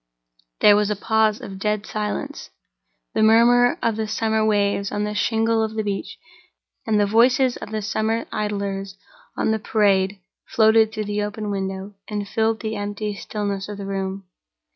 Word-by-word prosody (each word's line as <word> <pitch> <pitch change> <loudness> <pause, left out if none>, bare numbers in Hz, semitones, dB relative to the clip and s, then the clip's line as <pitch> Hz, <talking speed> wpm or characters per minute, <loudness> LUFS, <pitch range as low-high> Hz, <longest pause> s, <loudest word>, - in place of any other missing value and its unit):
There 205 - +7
was 210 0 +2
a 210 - 0
pause 220 +1 +1
of 195 -1 -8
dead 210 +1 -1
silence. 210 -1 -4 0.6
The - - +1
murmur 235 +3 +5
of 225 -2 +1
the 220 -1 -2
summer 220 0 0
waves 200 -2 +1
on 205 0 -1
the 210 0 -2
shingle 225 +1 +1
of 220 0 -2
the 220 - -1
beach 200 -1 -4 0.7
and 215 -1 +2
the 205 - +4
voices 245 +4 +3
of - - -8
the 215 -1 -3
summer 220 +2 -1
idlers 200 -2 -3 0.4
on - - +1
the 220 - 0
Parade 200 -2 +1 0.3
floated 220 0 +4
through 215 -1 -4
the 205 0 -2
open 210 0 -4
window, 190 0 -4
and 205 -1 -4
filled 225 +1 0
the 220 -1 -3
empty 205 +1 -3
stillness 200 -1 -4
of 205 - -6
the 200 - -6
room. 195 0 -3
210 Hz, 170 wpm, -22 LUFS, 200-220 Hz, 0.7 s, There